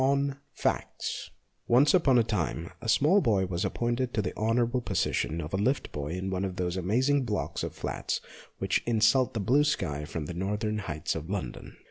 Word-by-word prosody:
V - - +3
ON 140 0 +2 0.2
FACTS - - -2 0.4
ONCE 130 +5 +5
upon 145 -8 +5
a 120 - +5
time 85 -6 -2
a 115 - -3
small 160 - +5
boy 100 - +2
was 90 -1 -2
appointed 120 +1 -1
to 110 - +2
the 90 - -3
honourable 120 +3 +1
position 85 -7 0
of 75 +1 -5
lift 120 +9 0
boy 70 -1 -4
in 95 +1 -3
one 95 0 -1
of 95 -2 -3
those 90 0 -1
amazing 125 +10 +2
blocks 105 -4 -2
of - - -4
flats - - -2 0.4
which - - +1
insult 120 +3 +3
the - - 0
blue 130 +9 +4
sky 90 - -1
from 75 0 -4
the 85 - -5
northern 105 +4 -1
heights 75 -7 -3
of 80 +1 -6
London. 100 -2 -5
105 Hz, 190 wpm, -29 LUFS, 90-125 Hz, 0.4 s, ONCE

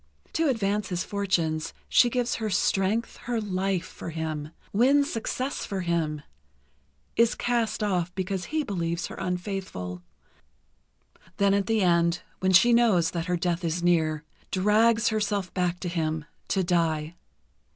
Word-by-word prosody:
To 325 -1 +2
advance 210 -4 0
his 180 0 -1
fortunes, 165 -6 -1
she 245 - +5
gives 245 0 0
her 220 -1 -2
strength, 200 +3 +1
her 240 -2 0
life, 190 -3 -1
for - - -8
him, 155 -2 -4 0.2
wins 275 +6 +4
success 255 +4 -2
for 195 -2 -3
him, 160 -4 -1 0.9
is 230 0 +3
cast 230 -3 0
off 180 -4 0
because 190 0 -2
he 310 0 -1
believes 170 -7 -2
her - - -7
unfaithful, 180 - -4 1.4
then 200 -1 +3
at 200 -1 +1
the 225 -1 +2
end, 170 -1 +2 0.2
when 190 0 +2
she 190 +6 +6
knows 225 -8 +4
that 170 -1 -3
her 180 -1 +1
death 175 +1 -1
is 170 +1 -1
near, 160 -3 +2 0.3
drags 220 +4 +3
herself 210 -3 -1
back 180 -1 0
to 180 - -3
him, 160 -3 -2 0.2
to 190 - +1
die. 165 -3 0
185 Hz, 145 wpm, -27 LUFS, 170-215 Hz, 1.4 s, she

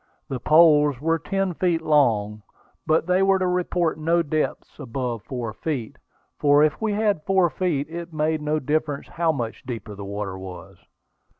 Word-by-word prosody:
The 130 - -3
poles 150 -2 +5
were 165 +3 +1
ten 195 +2 -1
feet 170 -1 +1
long, 110 -9 +2 0.5
but 160 +1 +2
they 180 +2 +2
were 195 0 +4
to 185 - -1
report 180 -2 0
no 170 +2 +2
depths 155 0 -3
above 120 -2 -4
four 120 -3 -5
feet; 135 -9 -4 0.4
for 145 0 +5
if 155 +4 +1
we 220 -1 0
had 205 -5 +1
four 190 -1 +2
feet, 150 -2 -1
it 170 +1 -7
made 155 0 0
no 150 +1 0
difference 150 0 -2
how 170 -1 +1
much 120 -7 -4
deeper 115 -4 -6
the 100 0 -8
water 100 -1 -5
was. 95 0 -10
155 Hz, 170 wpm, -23 LUFS, 125-170 Hz, 0.5 s, poles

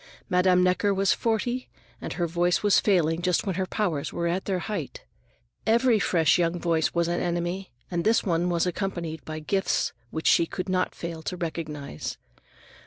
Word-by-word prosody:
Madame 180 0 +4
Necker 190 +2 +2
was 195 0 +3
forty, 240 +3 -1 0.3
and - - -4
her 175 - -1
voice 175 +3 +1
was 205 -1 +5
failing 170 -5 +2
just 180 -1 +1
when 195 - -1
her 185 +1 -2
powers 170 -9 -1
were 170 - -2
at 175 +3 -1
their 190 -2 0
height. 210 +4 -5 0.6
Every 230 0 +4
fresh 170 -2 +3
young 175 0 +1
voice 165 -2 +1
was 170 0 +2
an 175 0 -1
enemy, 175 +2 -2 0.2
and 170 -1 -1
this 225 +2 +3
one 175 -2 +1
was 170 -1 +1
accompanied 170 -4 -3
by 155 0 -5
gifts 190 +6 0 0.2
which 160 +4 -5
she 170 - +5
could 185 +3 -5
not 185 0 0
fail 165 -1 -6
to 180 +3 -4
recognize. 155 - -5
175 Hz, 175 wpm, -26 LUFS, 165-195 Hz, 0.6 s, was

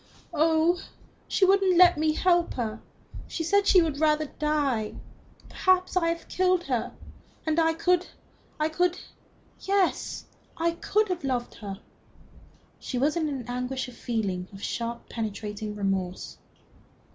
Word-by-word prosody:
"Oh, 320 +3 +3 0.5
she 385 - +3
wouldn't 385 -2 +4
let 360 -1 +8
me 310 0 +1
help 350 +1 +2
her. 225 -3 -3 0.5
She 330 - -3
said 405 +5 +2
she 365 -3 +6
would 300 -3 -2
rather 310 0 +3
die. 285 -8 -1 0.5
Perhaps 370 0 +2
I 350 -2 +2
have 335 0 -3
killed 365 -1 +2
her. 250 -7 -2 0.5
And 315 +1 +1
I 325 0 +3
could 360 +2 +2 0.5
I 305 - +2
could 355 +3 0 0.6
yes, 390 -1 0 0.3
I 335 +1 +1
could 420 +5 0
have 360 -4 -2
loved 250 -3 -2
her." 200 -2 -8 1.0
She 255 - -4
was 290 +5 +2
in 320 -3 0
an 265 -4 -4
anguish 250 +2 -3
of 245 - -13
feeling 200 -7 -2
of 195 0 -11
sharp 235 0 -3
and - - -31
penetrating 210 -1 -4
remorse. 195 -3 -3
310 Hz, 145 wpm, -27 LUFS, 235-350 Hz, 1.0 s, let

